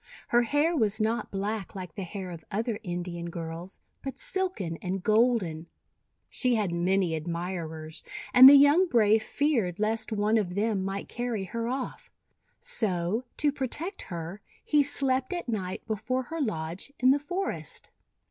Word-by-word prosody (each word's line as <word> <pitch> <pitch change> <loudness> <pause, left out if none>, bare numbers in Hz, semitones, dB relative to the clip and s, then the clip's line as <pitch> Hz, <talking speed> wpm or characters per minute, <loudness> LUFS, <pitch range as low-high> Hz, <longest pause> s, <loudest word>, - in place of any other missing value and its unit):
Her 240 - +5
hair 290 +8 +2
was 220 -5 +1
not 220 +1 0
black 200 0 -3
like 180 -4 -7
the - - -6
hair 185 0 -6
of 165 -2 -9
other 220 +1 -2
Indian 175 -2 -4
girls, 170 +2 -7 0.2
but 270 - -5
silken 375 - -2
and 185 +1 -4
golden. 215 -8 +2 0.6
She 250 -2 +1
had 205 -5 0
many 175 0 +1
admirers, 160 -1 -4 0.3
and 255 +1 +11
the 285 - +9
young 290 +7 +6
brave 220 -6 +4
feared 225 - 0
lest 220 +1 0
one 215 +1 +2
of 180 -4 -3
them 205 -1 0
might 195 +1 -4
carry 240 -4 -3
her 230 +5 -4
off. 260 +1 -4 0.5
So, 215 - -1
to 295 -1 +3
protect 300 - -3
her, 170 +3 -6 0.2
he 300 -1 +4
slept 270 -1 +1
at 350 -5 -4
night 190 -6 -3
before 225 +4 -2
her 325 +5 -5
lodge 175 - -3
in 255 +1 +5
the 285 - +3
forest. 360 +6 -5
215 Hz, 155 wpm, -28 LUFS, 180-255 Hz, 0.6 s, and